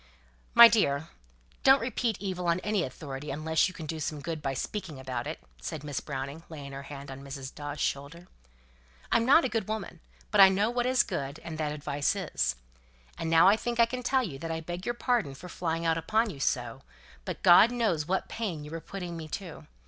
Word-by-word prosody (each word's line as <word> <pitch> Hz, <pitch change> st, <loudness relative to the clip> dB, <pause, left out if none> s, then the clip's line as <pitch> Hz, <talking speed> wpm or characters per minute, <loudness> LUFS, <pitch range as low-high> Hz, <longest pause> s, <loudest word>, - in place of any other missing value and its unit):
"My 235 Hz, -, +12 dB
dear, 160 Hz, -9 st, +1 dB, 0.5 s
don't 270 Hz, +1 st, +7 dB
repeat 235 Hz, -3 st, -1 dB
evil 185 Hz, -3 st, -3 dB
on 170 Hz, +1 st, +2 dB
any 210 Hz, -2 st, 0 dB
authority 140 Hz, 0 st, -6 dB
unless 155 Hz, +4 st, +1 dB
you 185 Hz, -, -7 dB
can 160 Hz, -, -7 dB
do 160 Hz, +1 st, -4 dB
some 150 Hz, 0 st, -3 dB
good 160 Hz, +1 st, -4 dB
by 135 Hz, -2 st, -2 dB
speaking 170 Hz, -2 st, -5 dB
about 130 Hz, -2 st, -4 dB
it," -, -, -5 dB, 0.2 s
said 155 Hz, -3 st, -5 dB
Miss 145 Hz, -3 st, -3 dB
Browning, 140 Hz, +2 st, -5 dB
laying 145 Hz, -4 st, -8 dB
her 135 Hz, 0 st, -6 dB
hand 140 Hz, 0 st, -9 dB
on 135 Hz, 0 st, -8 dB
Mrs. 135 Hz, -1 st, -7 dB
Dawes' 145 Hz, 0 st, -6 dB
shoulder. 145 Hz, +5 st, -3 dB, 0.9 s
"I'm 230 Hz, 0 st, +3 dB
not 325 Hz, +5 st, +6 dB
a -, -, +3 dB
good 225 Hz, -4 st, -2 dB
woman, 215 Hz, -5 st, -4 dB, 0.3 s
but 210 Hz, -2 st, +6 dB
I 190 Hz, -, +10 dB
know 200 Hz, +4 st, +1 dB
what 245 Hz, 0 st, 0 dB
is 255 Hz, 0 st, +4 dB
good, 140 Hz, -7 st, -4 dB
and 160 Hz, -2 st, -6 dB
that 150 Hz, -1 st, -1 dB
advice 145 Hz, +2 st, -1 dB
is. 65 Hz, -, -1 dB, 0.6 s
And 165 Hz, -, -2 dB
now 165 Hz, +2 st, +6 dB
I 200 Hz, -, +7 dB
think 235 Hz, +1 st, -3 dB
I 235 Hz, -, +8 dB
can 250 Hz, +2 st, -5 dB
tell 260 Hz, +1 st, +2 dB
you 140 Hz, -, -5 dB
that 165 Hz, +2 st, -5 dB
I 165 Hz, 0 st, -2 dB
beg 175 Hz, +3 st, -6 dB
your 240 Hz, -, 0 dB
pardon 235 Hz, -, 0 dB
for 180 Hz, -, -10 dB
flying 165 Hz, -1 st, -2 dB
out 165 Hz, 0 st, +2 dB
upon 220 Hz, +6 st, +1 dB
you 140 Hz, -, -10 dB
so; 125 Hz, -1 st, -1 dB, 0.4 s
but -, -, -6 dB
God 175 Hz, +6 st, +8 dB
knows 210 Hz, -11 st, 0 dB
what 190 Hz, +1 st, 0 dB
pain 185 Hz, -10 st, -4 dB
you 150 Hz, -, -9 dB
were 165 Hz, 0 st, -5 dB
putting 180 Hz, -3 st, -6 dB
me 160 Hz, -1 st, -6 dB
to. 175 Hz, +1 st, -7 dB
165 Hz, 215 wpm, -29 LUFS, 145-210 Hz, 0.9 s, My